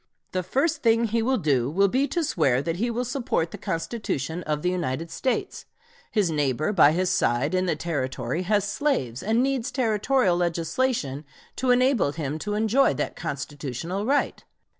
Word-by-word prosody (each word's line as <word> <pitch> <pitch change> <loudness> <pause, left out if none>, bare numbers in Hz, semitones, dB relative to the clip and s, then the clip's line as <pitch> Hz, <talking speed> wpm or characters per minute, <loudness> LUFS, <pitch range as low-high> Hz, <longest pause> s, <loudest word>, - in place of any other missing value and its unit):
The 185 - -1
first 275 - 0
thing 230 0 +3
he 230 0 +1
will 260 +3 +1
do 140 - +1
will 195 +6 +3
be 265 +8 +1
to 340 +2 -1
swear 140 - +1
that 165 +1 -2
he 235 +5 0
will 240 +2 -2
support 240 -10 -1
the - - -7
Constitution 165 - -3
of 150 -1 -2
the 180 - +2
United 165 -2 -3
States. 255 +10 -2 0.4
His 200 -6 +1
neighbor 150 - 0
by 155 -6 +6
his 180 +3 +1
side 125 +7 +1
in 185 0 +1
the 165 - +1
Territory 150 +1 -2
has 205 +2 +1
slaves 205 - -1
and 225 +4 +2
needs 270 -2 0
Territorial 230 -4 +2
legislation 170 - -1 0.3
to 260 - 0
enable 250 - +3
him 150 -1 -3
to 205 +4 -3
enjoy 220 - +3
that - - -3
constitutional 145 - -4
right. 285 +2 0
185 Hz, 170 wpm, -25 LUFS, 150-240 Hz, 0.4 s, by